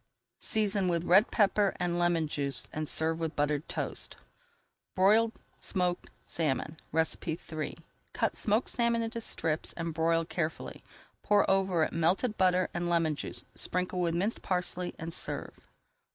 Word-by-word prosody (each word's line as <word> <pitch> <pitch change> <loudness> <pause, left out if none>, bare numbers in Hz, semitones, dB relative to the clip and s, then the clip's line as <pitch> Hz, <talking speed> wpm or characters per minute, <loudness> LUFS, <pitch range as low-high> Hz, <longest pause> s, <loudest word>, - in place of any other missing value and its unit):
Season 205 -3 +1
with 170 -2 0
red 190 +6 +5
pepper 205 -1 +2
and 175 -1 0
lemon 175 -2 +2
juice 140 -2 0
and 155 0 -2
serve 160 +2 +1
with 160 -1 -3
buttered 145 0 0
toast. - - -3 0.8
BROILED 215 +4 +4 0.3
SMOKED 180 -3 -1 0.2
SALMON 155 0 -2
III 160 0 -1 0.3
Cut - - -1
smoked 215 +3 +1
salmon 235 -1 +1
into 230 +1 -4
strips 160 -7 -2
and 165 -1 -4
broil 165 +1 +1
carefully. 160 -1 -4 0.4
Pour 205 -1 +3
over 190 -4 +2
it - - -2
melted 180 +8 +1
butter 185 -1 +3
and 175 0 -2
lemon 165 -3 +2
juice, - - -3
sprinkle 180 0 +1
with 170 -1 0
minced 200 +6 -1
parsley, 180 -1 -2
and 165 +1 -4
serve. - - -3
175 Hz, 140 wpm, -30 LUFS, 160-195 Hz, 0.8 s, red